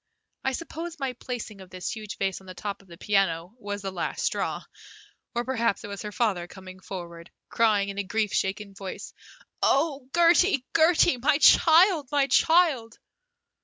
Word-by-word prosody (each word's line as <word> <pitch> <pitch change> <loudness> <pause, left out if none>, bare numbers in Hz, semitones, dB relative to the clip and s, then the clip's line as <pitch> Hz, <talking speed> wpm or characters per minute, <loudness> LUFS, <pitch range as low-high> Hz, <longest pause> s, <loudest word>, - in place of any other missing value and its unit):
I 265 - 0
suppose 335 +3 -6
my 270 -3 -3
placing 230 -5 -7
of 185 - -13
this 185 -1 -5
huge 215 -2 -8
vase 195 -1 -2
on 190 - -17
the 185 - -9
top 200 0 -5
of 195 - -23
the 170 -1 -13
piano 190 -3 0
was 205 -1 -5
the 195 - -3
last 180 -2 -4
straw, - - -2 0.7
or 240 0 -1
perhaps 230 -4 -1
it 205 - -7
was 200 -1 -6
her 210 - -6
father 200 -6 -1
coming 185 0 -12
forward, 170 -3 -9 0.2
crying 210 -3 +2
in 200 0 -5
a - - 0
grief 210 +1 -1
shaken 200 +1 -2
voice, 195 -1 -8 0.5
"Oh, 275 -2 +1
Gertie, 345 -4 +4
Gertie, 325 -3 +4
my 285 +4 +2
child, 325 0 +5
my 285 -2 +3
child!" 275 -5 +3
215 Hz, 170 wpm, -26 LUFS, 195-275 Hz, 0.7 s, child